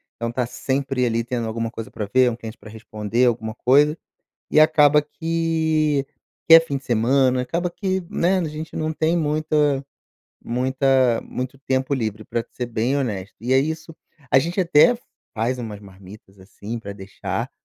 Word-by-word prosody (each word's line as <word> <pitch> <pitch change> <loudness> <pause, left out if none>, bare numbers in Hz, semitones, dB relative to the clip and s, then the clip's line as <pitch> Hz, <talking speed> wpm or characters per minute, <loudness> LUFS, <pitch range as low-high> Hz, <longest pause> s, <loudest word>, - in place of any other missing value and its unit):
então 115 0 -3
tá 125 0 -1
sempre, 130 +1 -1
ali, 115 0 0
tendo 120 -1 -3
alguma 115 +1 -3
coisa 115 -2 -7
pra 105 - -4
ver, 130 -1 +5
um 115 - -4
cliente 115 -1 -9
pra 110 - -13
responder, 110 +2 -1
alguma 110 -2 0
coisa, 145 +6 +3 0.5
e 155 - +5
acaba 150 -1 +5
que 160 -2 0 0.4
que 165 - +10
é 165 - +11
fim 145 -4 -4
de 135 - -8
semana, 125 +2 +2
acaba 170 +6 -2
que, 190 -1 -2
né, 185 +3 +2
a 180 - -1
gente 155 +2 -7
não 155 0 -2
tem 160 +2 +1
muita 150 -3 +1 0.6
muita 130 0 +2
muito 130 +1 -6
tempo 130 0 -1
livre 110 -4 -3
pra 115 - -2
te - - -27
ser 125 - -3
bem 120 +4 -1
honesto, 105 -8 -3
e 125 +3 -1
ai 135 - +5
isso 160 +2 -4 0.4
a 135 - +6
gente 170 +6 -1
até 180 +8 +5 0.4
faz 120 +3 -1
umas 105 -4 -6
marmitas, 95 0 -15
assim, 100 +4 -8
pra 100 -3 -7
deixar, 100 -1 -5
130 Hz, 175 wpm, -22 LUFS, 115-155 Hz, 0.6 s, é